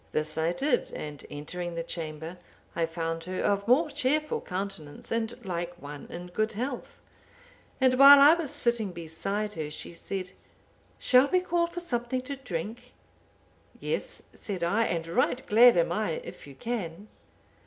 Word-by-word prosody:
This 155 Hz, 0 st, 0 dB
I 160 Hz, +1 st, +1 dB
did, 255 Hz, +8 st, 0 dB
and 150 Hz, -1 st, -6 dB
entering 170 Hz, +4 st, -5 dB
the 165 Hz, -, -2 dB
chamber, 165 Hz, +1 st, -5 dB, 0.4 s
I 165 Hz, -1 st, +1 dB
found 165 Hz, 0 st, -3 dB
her 185 Hz, 0 st, -4 dB
of 200 Hz, 0 st, +1 dB
more 295 Hz, +6 st, +4 dB
cheerful 295 Hz, +2 st, +1 dB
countenance, 185 Hz, -5 st, -6 dB
and 230 Hz, +1 st, -2 dB
like 175 Hz, -1 st, -4 dB
one 145 Hz, -1 st, -9 dB
in 175 Hz, +1 st, -7 dB
good 215 Hz, +4 st, -1 dB
health. 250 Hz, +4 st, -4 dB, 0.8 s
And 260 Hz, -1 st, +4 dB
while 280 Hz, +1 st, +11 dB
I 290 Hz, +3 st, +9 dB
was 335 Hz, -4 st, -2 dB
sitting 235 Hz, -7 st, 0 dB
beside 195 Hz, +6 st, -3 dB
her, 155 Hz, -2 st, -4 dB
she 155 Hz, -, -7 dB
said, 185 Hz, +1 st, -5 dB, 0.7 s
'Shall 255 Hz, +2 st, +5 dB
we 365 Hz, +4 st, +2 dB
call 345 Hz, -1 st, +1 dB
for 350 Hz, +1 st, -6 dB
something 250 Hz, -5 st, -2 dB
to 280 Hz, +2 st, -5 dB
drink?'—'Yes,' 245 Hz, +1 st, -7 dB
said 190 Hz, -5 st, -5 dB
I, 210 Hz, +7 st, +2 dB
'and 165 Hz, -4 st, -1 dB
right 250 Hz, +8 st, 0 dB
glad 235 Hz, 0 st, +7 dB
am 170 Hz, 0 st, +2 dB
I, 210 Hz, -2 st, 0 dB
if -, -, -10 dB
you 140 Hz, -, -11 dB
can. 200 Hz, -, -4 dB
200 Hz, 155 wpm, -28 LUFS, 165-250 Hz, 0.8 s, while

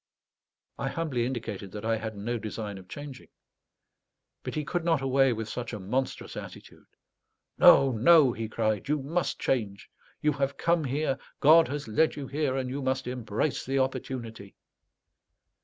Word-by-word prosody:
I -, -, -1 dB
humbly 135 Hz, -8 st, -1 dB
indicated 110 Hz, -6 st, -5 dB
that 105 Hz, +1 st, -6 dB
I 115 Hz, 0 st, +2 dB
had 110 Hz, -1 st, -6 dB
no 115 Hz, +4 st, -3 dB
design 105 Hz, -2 st, -5 dB
of 95 Hz, -, -15 dB
changing. 145 Hz, 0 st, -9 dB, 1.1 s
But -, -, -6 dB
he 150 Hz, -1 st, -2 dB
could 175 Hz, +2 st, -2 dB
not 165 Hz, -3 st, +2 dB
away 135 Hz, 0 st, +3 dB
with 110 Hz, -1 st, -3 dB
such 120 Hz, +1 st, -5 dB
a 105 Hz, -, -4 dB
monstrous 125 Hz, +8 st, -3 dB
attitude. -, -, -10 dB, 0.7 s
"No, 135 Hz, -1 st, +7 dB
no," 130 Hz, +3 st, +5 dB
he 110 Hz, -1 st, -5 dB
cried; 110 Hz, -2 st, -1 dB
"you 150 Hz, -2 st, 0 dB
must 165 Hz, +5 st, -1 dB
change. 105 Hz, -7 st, -2 dB, 0.3 s
You 150 Hz, -, +2 dB
have 140 Hz, 0 st, -2 dB
come 170 Hz, -1 st, +2 dB
here, 135 Hz, +1 st, -1 dB, 0.2 s
God 160 Hz, +3 st, +7 dB
has 145 Hz, -2 st, -4 dB
led 155 Hz, +9 st, +2 dB
you 145 Hz, -, -5 dB
here, 140 Hz, -1 st, -1 dB
and 130 Hz, -1 st, -2 dB
you 135 Hz, +3 st, -4 dB
must 130 Hz, 0 st, -1 dB
embrace 125 Hz, +2 st, -2 dB
the 135 Hz, +1 st, -1 dB
opportunity." 120 Hz, -6 st, -3 dB
130 Hz, 160 wpm, -28 LUFS, 110-145 Hz, 1.1 s, No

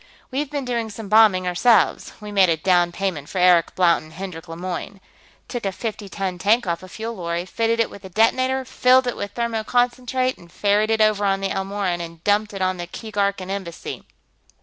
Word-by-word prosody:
We've 280 Hz, +2 st, -2 dB
been 285 Hz, -2 st, -3 dB
doing 235 Hz, -2 st, -2 dB
some 210 Hz, -1 st, -8 dB
bombing, 210 Hz, -4 st, +5 dB
ourselves; 220 Hz, +7 st, +3 dB
we 210 Hz, -1 st, -8 dB
made 195 Hz, -3 st, +4 dB
a 165 Hz, -, +2 dB
down 175 Hz, +1 st, +2 dB
payment 175 Hz, -6 st, -3 dB
for -, -, -6 dB
Eric 180 Hz, -2 st, +4 dB
Blount 175 Hz, -2 st, +3 dB
and 155 Hz, 0 st, -15 dB
Hendrik 180 Hz, -2 st, -7 dB
Lemoyne. 180 Hz, +4 st, -6 dB, 0.5 s
Took 245 Hz, -2 st, -5 dB
a 195 Hz, -, -1 dB
fifty 210 Hz, -1 st, -5 dB
ton 190 Hz, -2 st, -4 dB
tank 215 Hz, +5 st, +3 dB
off 170 Hz, -2 st, -2 dB
a 185 Hz, -, -10 dB
fuel 225 Hz, +4 st, -5 dB
lorry, 170 Hz, -3 st, -3 dB
fitted 230 Hz, +4 st, 0 dB
it 230 Hz, -, +1 dB
with 200 Hz, -, -12 dB
a 190 Hz, -, -9 dB
detonator, 255 Hz, +6 st, +2 dB
filled 255 Hz, +1 st, +4 dB
it 245 Hz, -, -2 dB
with 205 Hz, 0 st, -6 dB
thermoconcentrate, 245 Hz, +2 st, 0 dB
and 170 Hz, -1 st, -17 dB
ferried 205 Hz, +2 st, +1 dB
it 220 Hz, 0 st, +2 dB
over 215 Hz, -1 st, +3 dB
on 195 Hz, -1 st, +2 dB
the 195 Hz, 0 st, -2 dB
Elmoran 195 Hz, -2 st, -2 dB
and 165 Hz, -1 st, -9 dB
dumped 210 Hz, +1 st, +2 dB
it 195 Hz, -2 st, -3 dB
on 185 Hz, 0 st, 0 dB
the 175 Hz, 0 st, -5 dB
Keegarkan 200 Hz, -2 st, -2 dB
Embassy. 190 Hz, -4 st, -6 dB
200 Hz, 200 wpm, -22 LUFS, 180-225 Hz, 0.5 s, bombing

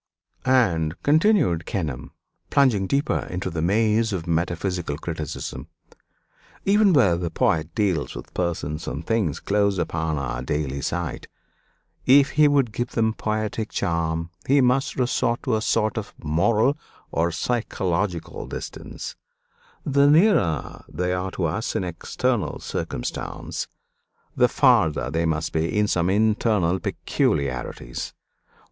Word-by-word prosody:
"And," 85 Hz, -12 st, +3 dB
continued 155 Hz, -, +3 dB
Kenelm, 75 Hz, -10 st, -3 dB, 0.4 s
plunging 120 Hz, -9 st, +3 dB
deeper 140 Hz, +6 st, 0 dB
into 90 Hz, +1 st, -3 dB
the 80 Hz, 0 st, -2 dB
maze 110 Hz, +5 st, +2 dB
of 90 Hz, -5 st, -3 dB
metaphysical 85 Hz, -1 st, -1 dB
criticism, 80 Hz, -2 st, -5 dB, 1.0 s
"even 205 Hz, 0 st, +5 dB
where 115 Hz, -, +5 dB
the 85 Hz, 0 st, -2 dB
poet 80 Hz, 0 st, 0 dB
deals 95 Hz, -8 st, 0 dB
with -, -, -9 dB
persons 80 Hz, -4 st, -2 dB
and 70 Hz, +6 st, -4 dB
things 105 Hz, -10 st, 0 dB
close 100 Hz, -1 st, +1 dB
upon 80 Hz, -3 st, -1 dB
our 70 Hz, -3 st, -3 dB
daily 70 Hz, -2 st, -2 dB
sight 85 Hz, +3 st, -3 dB, 0.8 s
if 140 Hz, +1 st, +6 dB
he 150 Hz, 0 st, +5 dB
would 140 Hz, -5 st, +2 dB
give 120 Hz, +2 st, -3 dB
them 110 Hz, -1 st, +2 dB
poetic 110 Hz, 0 st, -2 dB
charm 85 Hz, -2 st, -1 dB, 0.2 s
he 140 Hz, +2 st, +5 dB
must 130 Hz, +1 st, +2 dB
resort 120 Hz, -2 st, 0 dB
to 125 Hz, -, +1 dB
a 110 Hz, -, 0 dB
sort 110 Hz, 0 st, +1 dB
of 105 Hz, -, -9 dB
moral 110 Hz, -, +2 dB, 0.3 s
or 85 Hz, +1 st, +1 dB
psychological 95 Hz, -3 st, -2 dB
distance; -, -, -7 dB, 0.7 s
the 140 Hz, 0 st, +4 dB
nearer 155 Hz, -, +3 dB
they 90 Hz, 0 st, -1 dB
are 90 Hz, +1 st, -2 dB
to -, -, -2 dB
us -, -, -2 dB
in -, -, 0 dB
external 100 Hz, +6 st, -1 dB
circumstance, -, -, -4 dB, 0.7 s
the -, -, +4 dB
farther 80 Hz, -2 st, +3 dB
they 80 Hz, +1 st, 0 dB
must 80 Hz, 0 st, -1 dB
be 80 Hz, +5 st, 0 dB
in 105 Hz, 0 st, +3 dB
some 90 Hz, -2 st, +1 dB
internal 105 Hz, -3 st, +2 dB
peculiarities. 65 Hz, -7 st, -2 dB
95 Hz, 125 wpm, -24 LUFS, 80-115 Hz, 1.0 s, if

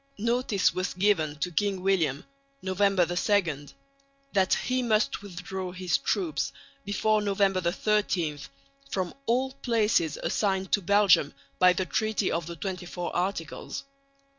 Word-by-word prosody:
Notice 230 Hz, -2 st, +1 dB
was 185 Hz, 0 st, -2 dB
given 180 Hz, -6 st, +2 dB
to 180 Hz, -, -1 dB
King 195 Hz, +2 st, 0 dB
William 165 Hz, -8 st, +1 dB, 0.4 s
(November 190 Hz, -1 st, +2 dB
2) 175 Hz, -4 st, 0 dB, 0.7 s
that 190 Hz, -2 st, +3 dB
he 255 Hz, +1 st, -1 dB
must 220 Hz, -4 st, +1 dB
withdraw 190 Hz, -1 st, -6 dB
his 180 Hz, 0 st, 0 dB
troops 170 Hz, -8 st, -1 dB, 0.3 s
before 215 Hz, +1 st, +1 dB
November 195 Hz, -2 st, +1 dB
13 175 Hz, -4 st, 0 dB, 0.5 s
from 185 Hz, -7 st, -2 dB
all 260 Hz, +3 st, +1 dB
places 225 Hz, -, +1 dB
assigned 190 Hz, -2 st, 0 dB
to 205 Hz, -, +3 dB
Belgium 195 Hz, -5 st, +4 dB, 0.2 s
by 180 Hz, 0 st, +6 dB
the 185 Hz, +1 st, -1 dB
Treaty 215 Hz, +1 st, 0 dB
of 165 Hz, 0 st, -2 dB
the 170 Hz, -, -6 dB
XXIV 180 Hz, -1 st, -5 dB
Articles. 175 Hz, -3 st, -3 dB
190 Hz, 125 wpm, -27 LUFS, 175-210 Hz, 0.7 s, by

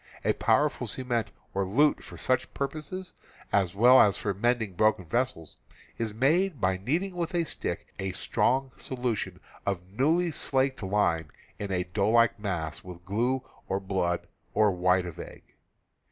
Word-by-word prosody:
A -, -, +4 dB
powerful -, -, +1 dB
cement 120 Hz, -4 st, -1 dB, 0.2 s
or 100 Hz, -, 0 dB
lute 135 Hz, +11 st, +2 dB
for -, -, -10 dB
such 130 Hz, 0 st, 0 dB
purpose, 155 Hz, +6 st, -4 dB, 0.4 s
as 95 Hz, -2 st, +2 dB
well 125 Hz, +5 st, +7 dB
as 100 Hz, -2 st, +4 dB
for 100 Hz, -, -1 dB
mending 110 Hz, 0 st, 0 dB
broken 110 Hz, -1 st, +2 dB
vessels, 120 Hz, -4 st, -2 dB, 0.4 s
is 115 Hz, -2 st, -1 dB
made 150 Hz, -, +2 dB
by 95 Hz, -1 st, +1 dB
kneading 165 Hz, -, -1 dB
with 175 Hz, +1 st, -2 dB
a 170 Hz, -, +2 dB
stick 160 Hz, -, -4 dB
a 95 Hz, 0 st, -2 dB
strong 130 Hz, +7 st, +1 dB
solution 125 Hz, -4 st, -3 dB, 0.2 s
of 90 Hz, -3 st, -2 dB
newly 160 Hz, -, +2 dB
slaked 135 Hz, -2 st, +1 dB
lime 95 Hz, -6 st, +1 dB, 0.3 s
into 100 Hz, -2 st, -2 dB
a 90 Hz, -, 0 dB
doughlike 110 Hz, +6 st, +2 dB
mass 85 Hz, -7 st, -3 dB
with 90 Hz, -1 st, -11 dB
glue 120 Hz, +6 st, 0 dB, 0.3 s
or 95 Hz, -, 0 dB
blood 95 Hz, -3 st, -1 dB, 0.3 s
or 105 Hz, -1 st, +5 dB
white 90 Hz, 0 st, +2 dB
of 85 Hz, -2 st, -8 dB
egg. -, -, -9 dB
110 Hz, 155 wpm, -28 LUFS, 95-130 Hz, 0.4 s, well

